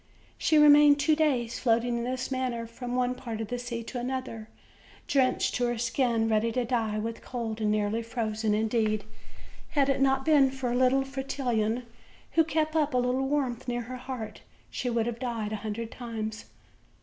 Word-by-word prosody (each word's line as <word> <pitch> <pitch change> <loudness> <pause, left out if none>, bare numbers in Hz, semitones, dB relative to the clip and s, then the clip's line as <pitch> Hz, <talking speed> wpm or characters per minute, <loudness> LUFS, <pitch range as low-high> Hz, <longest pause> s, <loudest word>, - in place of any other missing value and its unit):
She 315 - +3
remained 295 -1 +7
two 310 +2 +3
days 260 -7 0
floating 235 0 +1
in - - -3
this 255 +1 -3
manner 255 -3 -2
from 245 +2 -6
one 250 0 +1
part 235 -3 -6
of 220 -2 -4
the 245 - -3
sea 240 -1 -4
to 245 +2 -5
another, 245 -3 -4 0.6
denched 265 -2 +2
to 245 - +1
her 240 0 -1
skin, 240 -1 +1
ready 225 +1 +2
to 250 0 0
die 225 -3 0
with 225 +2 -4
cold, 225 -3 -4
and 215 - +1
nearly 210 +1 0
frozen; 220 -2 -1
indeed, 215 -1 +1 0.7
had 280 -1 +4
it 270 0 +1
not 270 0 +2
been 290 -4 +5
for 260 -2 -3
little 255 +2 +3
Fretillon, 250 -4 -1 0.5
who 325 - +4
kept 310 0 -1
up 300 -4 +1
a - - +4
little 250 +2 +1
warmth 265 -4 -1
near 240 0 -1
her 255 +2 -7
heart, 250 -4 -7 0.3
she 250 - -2
would 230 -2 +1
have 235 -1 -3
died 230 -4 -3
a - - -2
hundred 220 +2 -5
times. 225 -2 -5
245 Hz, 185 wpm, -28 LUFS, 225-265 Hz, 0.7 s, remained